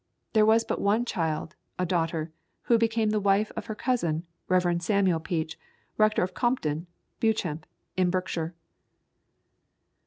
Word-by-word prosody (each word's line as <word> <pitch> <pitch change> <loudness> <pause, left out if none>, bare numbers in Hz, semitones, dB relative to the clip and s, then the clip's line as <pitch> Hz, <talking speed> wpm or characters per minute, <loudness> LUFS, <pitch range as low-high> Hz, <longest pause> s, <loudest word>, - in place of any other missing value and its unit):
There 215 -1 +5
was 225 +1 +5
but - - -3
one 215 +4 +2
child, 160 -6 -2 0.2
a 180 - 0
daughter, 165 -2 -1 0.3
who 235 -1 +4
became 225 -1 +2
the 215 - +2
wife 200 +1 +2
of - - -5
her 215 - -4
cousin, 175 -11 0 0.2
Rev. 175 -2 +2
Samuel 190 -2 +2
Peach, 160 -1 -3 0.4
rector 215 -2 +3
of 185 0 -3
Compton, 175 - 0 0.3
Beauchamp, 180 -9 0 0.3
in 185 -1 +3
Berkshire. 175 -2 -2
185 Hz, 135 wpm, -27 LUFS, 165-215 Hz, 0.4 s, There